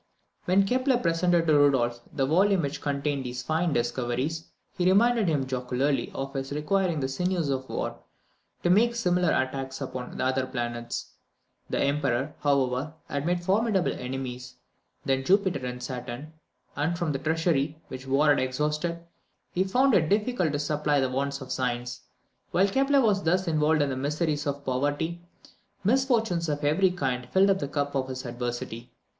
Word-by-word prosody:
When 190 +2 +4
Kepler 255 +3 +2
presented 170 -3 +2
to 155 - +3
Rudolph 130 -5 +3
the 135 - 0
volume 185 +5 +3
which 140 0 -3
contained 140 -1 -1
these 125 0 -5
fine 160 +4 0
discoveries, 125 +5 -1 0.3
he 180 -1 +1
reminded 225 +2 +4
him 145 -5 +1
jocularly 130 +2 -1
of 135 0 -4
his 135 0 -4
requiring 165 +3 0
the 130 - 0
sinews 175 +3 -1
of 130 -1 -3
war - - -3 0.6
to 175 - +3
make 235 +5 +4
similar 180 -6 +2
attacks 135 0 -1
upon 125 -1 -6
the - - 0
other 130 0 0
planets. 120 -2 -4 0.6
The - - -1
Emperor, 140 -2 0
however, 140 +1 0
had 140 +2 -2
more 180 +1 +2
formidable 195 +2 +1
enemies 125 -1 -6 0.5
than 135 0 +1
Jupiter 190 -4 +2
and 125 0 -6
Saturn, 125 +4 -6 0.4
and 155 +4 0
from 165 -2 -1
the 135 - -2
treasury, 155 -1 0
which 130 +1 -8
war 140 +3 +3
had 145 - +5
exhausted, 150 +6 -1 0.5
he 185 - +1
found 250 +7 +3
it 160 -6 +3
difficult 210 - +1
to - - +1
supply 150 0 +1
the 130 -1 0
wants 140 +2 -2
of 130 - -8
science. 125 -1 -2 0.5
While 190 +3 +3
Kepler 275 +5 +3
was 210 -5 +2
thus 185 +2 +1
involved 155 -1 +3
in 140 - -1
the 130 - -2
miseries 145 +2 -1
of 140 0 -3
poverty, 145 +6 -1 0.6
misfortunes 225 - +2
of 145 -1 -2
every 165 +6 +3
kind 130 -8 -2
filled 195 +1 +4
up 190 - +1
the 145 - -2
cup 145 0 -2
of 135 -1 -1
his 130 0 -6
adversity. 120 0 -5
145 Hz, 165 wpm, -27 LUFS, 130-175 Hz, 0.6 s, had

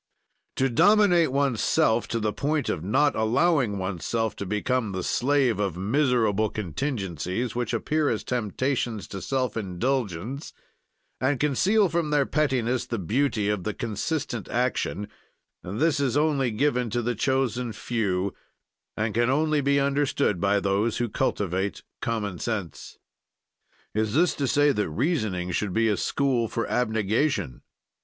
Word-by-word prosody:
"To 135 - +2
dominate 175 - +4
oneself 125 -4 +2
to 115 - -2
the 105 -1 -1
point 150 -1 -1
of 80 - -2
not 135 +8 +2
allowing 120 0 +2
oneself 100 +4 -2
to 100 - -5
become 105 +1 -1
the 95 -1 -3
slave 130 -2 +1
of 95 -5 -1
miserable 110 -1 +2
contingencies 105 - -3
which 120 -2 -2
appear 150 +6 0
as 110 - -1
temptations 120 -1 -2
to 95 - -6
self 130 -2 -1
indulgence, 115 - -2 0.7
and 130 0 +1
conceal 190 - +3
from 165 -2 -1
their 145 -2 +2
pettiness 130 -5 0
the 115 - -2
beauty 110 - 0
of 105 -3 -1
the 110 +1 -3
consistent 120 +1 -3
action 120 -4 -1 0.5
this 145 - 0
is 140 -1 +1
only 145 -4 +2
given 125 +1 0
to 120 +2 -1
the 120 +2 0
chosen 125 0 0
few 100 -3 -1 0.6
and 110 0 -1
can 120 +3 +2
only 150 +2 +2
be 140 0 +2
understood 140 -7 +1
by 100 +1 +3
those 100 +3 0
who 120 -1 -1
cultivate 95 -2 -1 0.2
common 105 -6 -2
sense." 105 -8 -4 1.0
Is 110 +1 0
this 175 +3 +4
to 140 - -2
say 145 +4 +4
that 105 -9 -1
reasoning 105 - -1
should 95 +1 -1
be 115 +2 +2
a 105 - +2
school 130 0 0
for 115 - -3
abnegation. 110 - 0
120 Hz, 140 wpm, -26 LUFS, 105-140 Hz, 1.0 s, dominate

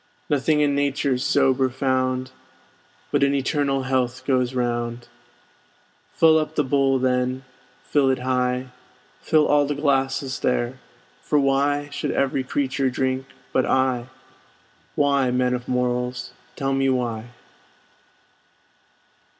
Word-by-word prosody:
Nothing 150 +1 +2
in 145 -1 +2
nature's 140 -2 0
sober 135 -2 +2
found, 130 0 -1 0.8
But - - +1
an 140 0 +3
eternal 135 0 0
health 130 -1 -1
goes 130 -2 +1
round. 120 -1 -2 1.1
Fill 160 -1 +5
up 155 0 -4
the 150 - +2
bowl 135 0 +2
then, 130 0 0 0.4
fill 140 -2 +2
it 130 - +2
high, 125 0 -1 0.5
Fill 155 -2 +3
all 145 -1 +3
the 145 - -2
glasses 135 -2 0
there; 125 +1 -1 0.4
for 150 - 0
why 145 +1 +1
Should 140 - -3
every 135 -1 0
creature 135 0 -1
drink 130 +1 -2 0.3
but 130 - +2
I? 130 -2 +1 0.9
Why, 140 -2 +2
man 125 0 +1
of 125 0 -4
morals, 125 0 -2 0.2
tell 135 0 -1
me 135 0 +1
why? 120 -3 -2
130 Hz, 120 wpm, -23 LUFS, 125-140 Hz, 1.1 s, Fill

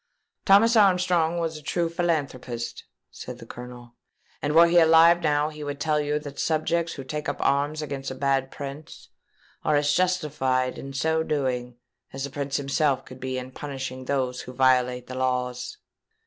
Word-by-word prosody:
"Thomas 220 +4 +6
Armstrong 180 -5 +3
was 165 -2 -2
a - - -11
true 170 +3 -1
philanthropist," 145 -8 -3 0.3
said - - -8
the - - -11
Colonel; 120 -1 -10 0.5
"and 150 +1 -1
were 170 +1 +9
he 170 +1 +5
alive 165 +1 +6
now, 150 -1 +1
he 150 -1 -9
would 145 -1 -5
tell 150 0 +1
you 150 0 0
that 145 -2 -8
subjects 165 +1 0
who 135 - -7
take 150 +3 -4
up 145 - -3
arms 145 +3 +1
against 140 -2 -5
a 130 - -6
bad 135 0 0
prince 140 +2 -9 0.5
are 150 - +2
as 145 0 +2
justified 150 -8 0
in 135 - -7
so 160 +4 0
doing 130 -5 -2 0.4
as 135 0 -5
the 140 - -4
prince 140 -1 -2
himself 140 -1 0
could 130 0 -12
be 130 0 -3
in 130 0 -6
punishing 130 -2 -6
those 130 -2 -1
who 125 - -9
violate 125 -1 +2
the 130 - -8
laws." 125 - -2
145 Hz, 175 wpm, -25 LUFS, 130-160 Hz, 0.5 s, were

